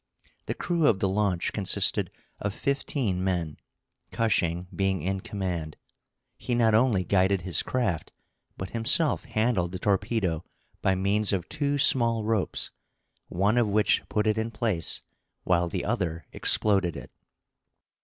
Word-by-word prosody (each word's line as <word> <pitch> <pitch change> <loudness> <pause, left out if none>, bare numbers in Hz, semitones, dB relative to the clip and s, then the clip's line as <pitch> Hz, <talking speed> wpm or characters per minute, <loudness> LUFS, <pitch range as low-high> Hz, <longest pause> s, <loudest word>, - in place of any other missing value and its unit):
The - - -2
crew 170 -4 +1
of 105 - +4
the 95 - 0
launch 95 -3 0
consisted 100 -3 +1 0.3
of 100 0 -3
fifteen 130 -8 -1
men, 85 -5 -1 0.5
Cushing 90 -6 0
being 95 -4 0
in 95 +2 -1
command. 90 -6 -4 0.6
He 120 - -2
not 115 -2 +3
only 110 -4 +3
guided 95 +1 +2
his 85 -2 0
craft, 115 -11 -2 0.5
but 95 - -6
himself 120 +7 +2
handled 110 -6 0
the - - -3
torpedo 100 -3 0 0.4
by 95 - +2
means 100 +2 +2
of 95 -3 -1
two 145 -2 -1
small 115 -5 +3
ropes, 110 -3 -1 0.6
one 100 +7 +1
of 115 -3 +2
which 105 +1 +3
put 105 0 0
it 110 0 +1
in 110 +1 -2
place, 110 -7 -1 0.4
while 85 -1 +2
the 90 +1 -3
other 90 -8 -2
exploded 95 -6 +2
it. - - -10
100 Hz, 140 wpm, -27 LUFS, 90-115 Hz, 0.6 s, of